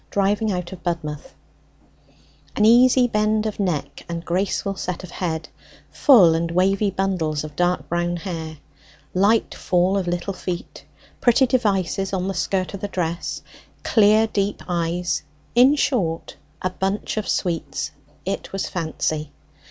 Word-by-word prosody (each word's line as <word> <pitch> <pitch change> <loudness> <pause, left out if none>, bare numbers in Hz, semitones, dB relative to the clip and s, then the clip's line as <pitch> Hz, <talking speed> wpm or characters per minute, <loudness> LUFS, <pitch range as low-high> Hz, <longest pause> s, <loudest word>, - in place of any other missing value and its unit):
DRIVING 205 +2 +1
OUT 180 -2 -3
OF 185 -2 -9
BUDMOUTH 165 - -4 1.2
An 210 - +3
easy 245 +2 +6
bend 215 -1 +1
of 215 -1 -3
neck 175 -8 -2
and 170 0 -4
graceful 195 +2 -1
set 180 -1 -4
of 180 - -9
head; 160 -3 -3 0.4
full 200 - +6
and 165 +1 0
wavy 195 +4 +2
bundles 180 -6 -1
of 150 -1 -8
dark 180 0 0
brown 175 0 -1
hair; 165 -3 -5 0.6
light 205 +4 +3
fall 185 +2 +1
of 185 - -4
little 175 +3 -2
feet; 180 -2 -6 0.3
pretty 245 +2 +4
devices 195 -6 0
on 185 -1 -1
the 195 - -1
skirt 185 +1 -1
of 195 - -6
the 205 - -2
dress; 175 -3 -3 0.4
clear 215 0 +5
deep 205 -2 -2
eyes; 175 -1 -1 0.3
in 255 +4 +6
short, 220 - -1 0.3
a 185 - 0
bunch 195 +2 -2
of 215 - -2
sweets: 165 -6 -2 0.3
it 195 - -3
was 195 - -2
Fancy! 155 -3 -2
185 Hz, 145 wpm, -22 LUFS, 170-205 Hz, 1.2 s, easy